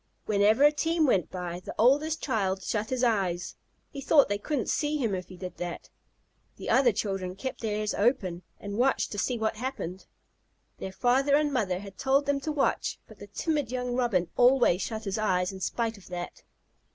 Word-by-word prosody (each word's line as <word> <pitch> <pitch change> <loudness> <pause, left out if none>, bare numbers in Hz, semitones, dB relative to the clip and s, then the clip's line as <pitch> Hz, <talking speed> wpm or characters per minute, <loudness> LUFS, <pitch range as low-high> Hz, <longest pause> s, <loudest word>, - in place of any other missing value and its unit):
Whenever 215 +5 +3
a 295 - +8
team 325 +2 +1
went 195 - +2
by, 175 -1 -5
the 180 - -8
oldest 295 +7 +3
child 195 -7 0
shut 215 0 -2
his 255 -1 -1
eyes. 190 -7 0 0.4
He 275 - -7
thought 285 -2 +5
they 205 0 -1
couldn't 280 +2 -2
see 300 0 0
him 230 -8 0
if 185 -1 -4
he 185 - -12
did 180 0 -7
that. 175 -1 -6 0.6
The - - -4
other 260 -2 +5
children 195 -3 -3
kept 260 +7 -5
theirs 210 -1 -1
open 200 -6 +1 0.2
and 205 +2 -5
watched 265 +2 +2
to 205 - -3
see 245 +5 0
what 220 -1 -1
happened. 215 -7 -5 0.7
Their 190 - -5
father 255 +8 +3
and 295 -1 +2
mother 200 -8 0
had 195 -1 -11
told 275 +2 +2
them 285 0 +1
to 310 +3 -3
watch, 295 -2 0
but - - -15
the - - -10
timid 295 -7 -2
young 250 -1 -2
Robin 235 -9 +1
always 245 -7 +5
shut 220 -1 -4
his 195 0 -2
eyes 180 -3 +1
in 190 - -9
spite 225 +2 -2
of 190 - -17
that. 175 -1 -6
220 Hz, 195 wpm, -28 LUFS, 190-265 Hz, 0.7 s, a